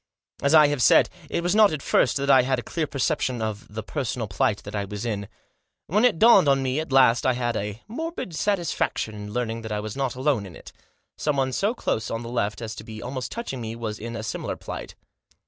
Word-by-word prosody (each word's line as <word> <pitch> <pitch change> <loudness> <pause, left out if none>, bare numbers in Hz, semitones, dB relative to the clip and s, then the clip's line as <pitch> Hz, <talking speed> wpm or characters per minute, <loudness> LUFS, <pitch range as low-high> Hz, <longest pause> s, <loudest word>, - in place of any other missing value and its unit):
As 140 +3 +4
I 155 -1 +8
have 145 -3 -1
said, - - +5 0.2
it 170 - -1
was 175 - +1
not 215 -1 +6
at 155 -3 -4
first 125 - +2
that 140 0 -2
I 130 -1 +7
had 130 +1 0
a 120 - -4
clear 160 -3 -2
perception 135 -3 -1
of 110 -2 -4
the 110 +1 -5
personal 125 -5 -3
plight 100 +2 0
that 100 - -7
I 100 - -1
was 105 +3 -6
in. 100 -3 -3 0.6
When 210 +7 +1
it 235 -9 +3
dawned 200 -6 +6
on 135 -1 +3
me 130 +2 0
at 160 -2 -5
last 130 -3 +5
I 130 - +3
had 120 -1 -1
a 105 +2 -4
morbid 320 - -5
satisfaction 170 - -1
in 105 0 -7
learning 115 -1 -2
that 110 -1 -7
I 105 - -1
was 105 0 -5
not 135 -2 -2
alone 130 -6 0
in 85 - -12
it. - - -12 0.5
Someone 135 -3 0
so 205 - 0
close 110 - -2
On 115 +1 -3
the 115 - -7
left 115 -2 -2
as 110 -1 -4
to - - -7
be 110 -1 -9
almost 125 +2 -5
touching 230 - -5
me 115 0 -5
was 110 -2 -5
in 115 +1 -6
a 110 - -5
similar 110 - -3
plight. - - -8
125 Hz, 235 wpm, -25 LUFS, 110-150 Hz, 0.6 s, I